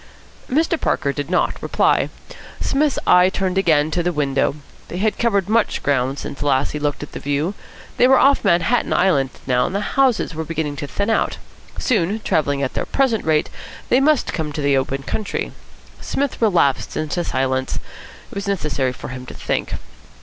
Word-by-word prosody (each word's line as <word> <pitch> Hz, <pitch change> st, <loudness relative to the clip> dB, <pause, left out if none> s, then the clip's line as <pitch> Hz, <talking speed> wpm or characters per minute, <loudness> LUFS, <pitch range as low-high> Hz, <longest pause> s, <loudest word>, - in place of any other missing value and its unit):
Mr. 320 Hz, +4 st, +1 dB
Parker 140 Hz, -, 0 dB
did 145 Hz, +2 st, -4 dB
not 180 Hz, -, 0 dB
reply. -, -, +2 dB, 0.5 s
Psmith's 290 Hz, 0 st, +1 dB
eye 180 Hz, +1 st, +6 dB
turned 190 Hz, -1 st, -1 dB
again 155 Hz, -4 st, +3 dB
to 175 Hz, -, 0 dB
the 175 Hz, +1 st, 0 dB
window. 140 Hz, -3 st, 0 dB, 0.3 s
They 175 Hz, -, -6 dB
had 215 Hz, +3 st, 0 dB
covered 200 Hz, -5 st, +2 dB
much 220 Hz, +1 st, +1 dB
ground 135 Hz, -1 st, +1 dB
since 140 Hz, -, -7 dB
last 140 Hz, -1 st, +1 dB
he -, -, -3 dB
had -, -, -11 dB
looked 145 Hz, 0 st, -1 dB
at 150 Hz, -, -9 dB
the -, -, -6 dB
view. 145 Hz, +6 st, -1 dB, 0.4 s
They 250 Hz, -, +6 dB
were 265 Hz, 0 st, +6 dB
off 275 Hz, +1 st, +4 dB
Manhattan 175 Hz, +8 st, +2 dB
Island 145 Hz, -8 st, +3 dB, 0.2 s
now, 125 Hz, -1 st, +2 dB
and 185 Hz, -, -5 dB
the -, -, +1 dB
houses 250 Hz, -4 st, +1 dB
were 160 Hz, +1 st, -3 dB
beginning 155 Hz, -2 st, -3 dB
to 145 Hz, -, -4 dB
thin 200 Hz, +8 st, -1 dB
out. 225 Hz, -, +1 dB, 0.4 s
Soon, 210 Hz, -3 st, +1 dB
travelling 145 Hz, -7 st, 0 dB
at 130 Hz, -, -2 dB
their -, -, -3 dB
present 260 Hz, -6 st, +1 dB
rate, 155 Hz, -1 st, +1 dB, 0.4 s
they 250 Hz, -, +5 dB
must 295 Hz, 0 st, +2 dB
come 160 Hz, -2 st, -2 dB
into 150 Hz, 0 st, -4 dB
the 140 Hz, -1 st, +3 dB
open 135 Hz, 0 st, -1 dB
country. 205 Hz, +7 st, -3 dB, 0.5 s
Psmith 280 Hz, -3 st, -2 dB
relapsed 175 Hz, -, +2 dB
into 155 Hz, +3 st, -1 dB
silence. 130 Hz, -2 st, -1 dB
It -, -, -12 dB
was 200 Hz, 0 st, -4 dB
necessary 150 Hz, -9 st, -1 dB
for -, -, -8 dB
him 130 Hz, 0 st, -8 dB
to -, -, -9 dB
think. -, -, -2 dB
165 Hz, 185 wpm, -20 LUFS, 140-210 Hz, 0.5 s, eye